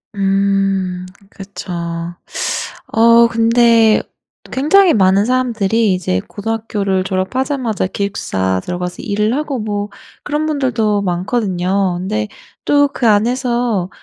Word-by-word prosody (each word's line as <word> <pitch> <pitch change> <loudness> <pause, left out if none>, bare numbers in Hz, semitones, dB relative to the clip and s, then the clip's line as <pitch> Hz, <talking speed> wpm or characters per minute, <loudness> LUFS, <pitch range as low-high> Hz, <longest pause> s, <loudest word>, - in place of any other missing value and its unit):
음 195 -2 0 0.2
그쵸. 195 -1 -9 1.2
어 230 +1 +5
근데 230 -1 +4 0.5
굉장히 345 +8 +4
많은 195 0 +3
사람들이 230 -4 +1
이제 165 - -1
고등학교를 205 -3 -2
졸업하자마자 225 +5 -1
기숙사 95 - -2
들어가서 180 0 -5
일을 210 +4 0
하고 290 -3 -2
뭐 205 -1 -3 0.3
그런 295 +1 -2
분들도 230 -8 0
많거든요. 185 -1 -1
근데 105 - -2 0.4
또 285 0 +4
그 240 - 0
안에서 235 -2 +1
210 Hz, 240 characters per minute, -16 LUFS, 190-235 Hz, 1.2 s, 어